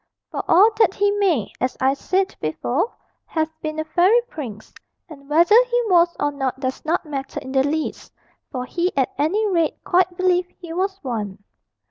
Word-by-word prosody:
For - - -3
all 405 +6 +6
that 415 - +4
he 405 0 +2
may, 330 - +1
as 255 - -1
I 265 +1 +3
said 375 +7 -1
before, 250 - -1 0.4
have 315 -1 -1
been 310 0 -4
a 315 - -1
fairy 365 +8 +4
prince, 225 - -8 0.3
and 280 -4 -14
whether 335 +7 +4
he 485 +1 +5
was 345 -1 +4
or 290 - +1
not 270 -2 -3
does 260 -1 -3
not 330 +2 0
matter 275 -3 -5
in 260 - -9
the 265 0 +3
least 305 +3 -3 0.4
for 250 -1 -4
he 350 +7 -1
at 265 - +1
any 395 +9 +1
rate 335 -5 0
quite 360 -1 +2
believed 360 -1 +1
he 335 -2 -8
was 385 +2 -1
one. 210 -6 -4
320 Hz, 180 wpm, -22 LUFS, 270-370 Hz, 0.4 s, all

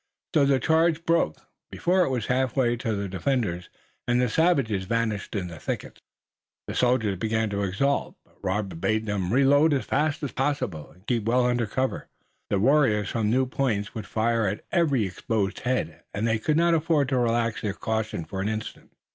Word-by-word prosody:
So 145 -3 +4
the 135 -1 +3
charge 160 +3 +2
broke, 165 - +2 0.3
before 185 +2 +1
it 170 - 0
was 125 -5 -1
half 130 -1 0
way 120 -3 +2
to 115 -2 -2
the 100 0 -3
defenders, 95 -2 -1 0.4
and 120 0 +2
the 125 -1 +2
savages 130 - +2
vanished 115 -1 -2
in 95 -3 -1
the 85 -3 -9
thickets. - - -5 0.6
The - - -5
soldiers 110 -7 +1
began 110 0 0
to 100 0 -1
exult, 120 +9 0
but - - -30
Robert 95 -3 -2
bade 110 0 +1
them 100 -4 -2
reload 145 +4 +4
as 135 - -2
fast 150 +2 0
as 145 - -2
possible, 135 - -2
and 90 +3 -22
keep 115 -3 -1
well 125 +2 +3
under 120 -2 +1
cover. 130 +5 -2 0.4
The 100 - +1
warriors 115 -3 +3
from 110 -3 0
new 130 +3 +3
points 120 -6 -1
would 110 -2 -6
fire 115 0 +1
at 100 +3 -4
every 145 - +2
exposed 100 +1 -2
head, 125 -11 -2
and 105 +3 0
they 110 -1 +1
could 150 +7 +1
not 170 0 +4
afford 155 -4 +2
to 130 -2 +1
relax 115 -1 0
their 105 -2 -2
caution 110 -5 -3
for 95 +3 -5
an 100 - -1
instant. 110 0 -6
115 Hz, 190 wpm, -26 LUFS, 105-135 Hz, 0.6 s, So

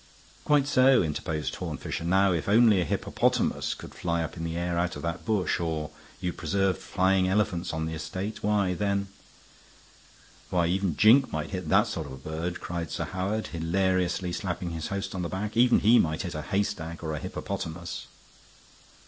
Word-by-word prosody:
"Quite 145 -2 +4
so," 130 -3 +5
interposed 75 0 -2
Horne - - -4
Fisher. - - -4
"Now 95 +3 +3
if 85 +2 -1
only 110 -2 +6
a - - 0
hippopotamus - - 0
could - - -11
fly 85 -1 -1
up 80 - -6
in 85 - -6
the 85 0 -3
air 85 0 -1
out 85 -1 -1
of 75 - -7
that 85 0 -3
bush, 105 -6 +1
or 80 -3 -2 0.3
you 90 -2 -2
preserved 95 +2 0
flying 95 0 +2
elephants 95 -3 0
on 80 -1 -2
the 80 - -4
estate, 95 +6 -5
why, 100 -3 +2
then 100 +2 -1 0.7
" - - -26
"Why 85 -2 +2
even 90 -1 0
Jink 125 +5 +6
might 80 +1 -3
hit 90 -5 -4
that 100 +6 +5
sort 95 -9 -4
of 65 0 -10
bird," 80 +3 -3
cried 85 -2 -4
Sir - - -3
Howard, 100 +4 -2
hilariously 90 +2 0
slapping 90 -2 -3
his 80 -1 -4
host 100 0 -3
on 95 - -3
the 85 - -3
back. 105 +3 -4
"Even 120 +1 +5
he 115 +3 +6
might 80 +1 0
hit 90 -2 -4
a 75 - -4
haystack 90 -3 -2
or 80 -1 -2
a 75 - -3
hippopotamus." 85 +4 -5
90 Hz, 185 wpm, -27 LUFS, 85-100 Hz, 0.7 s, only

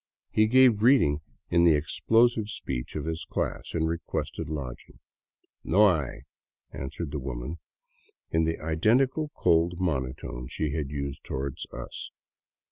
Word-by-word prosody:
He 110 0 +4
gave 125 -1 +6
greeting 105 - +4 0.3
in 85 0 +5
the 85 -3 +6
explosive 110 +8 +2
speech 65 -11 -5
of - - -3
his 80 0 -3
class - - -3
and 80 -1 +1
requested 85 -1 -3
lodging. 70 -6 -6 0.4
" - - -47
No 105 -3 +7
hay," 65 -5 -5 0.5
answered 70 +3 -5
the 75 - -3
woman, 65 +4 -5 0.7
in 80 0 +2
the 80 0 -1
identical 125 - +2
cold 85 0 +2
monotone 65 -6 -2
she 75 +3 -2
had 75 -3 -2
used 70 0 -4
toward 65 0 -4
us. - - -7
80 Hz, 135 wpm, -28 LUFS, 70-105 Hz, 0.7 s, No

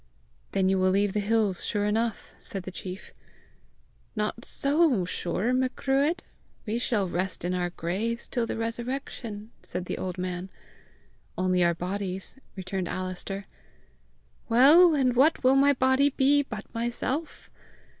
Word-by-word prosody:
"Then 190 -1 +2
you 190 0 +2
will 185 0 +3
leave 200 +1 +2
the 210 - +1
hills 210 -3 +1
sure 205 -2 0
enough!" 225 +2 -1
said 195 -2 -6
the 185 - -7
chief. 185 +1 -8 1.0
"Not 215 +2 -2
so 280 - +2
sure, 185 +6 -1
Macruadh! 270 +5 +1 0.4
We 220 +2 -1
shall 215 -5 0
rest 180 0 -3
in 180 - 0
our 180 -1 0
graves 200 +8 -3
till 240 -3 -1
the - - -3
resurrection!" 230 -2 -4
said 180 0 -4
an - - -3
old 185 -1 -4
man. 180 0 -4 0.9
"Only 185 -1 +2
our 170 0 +3
bodies," 190 +5 -4 0.2
returned 185 -1 -3
Alister. 185 +2 -4 1.0
"Well, 305 +8 +7
and 255 -3 +2
what 280 +5 +4
will 260 +1 +5
my 280 +1 +5
body 260 +2 +3
be 280 +1 +3
but 220 -6 -7
myself! 240 +6 -3
215 Hz, 140 wpm, -27 LUFS, 185-260 Hz, 1.0 s, Well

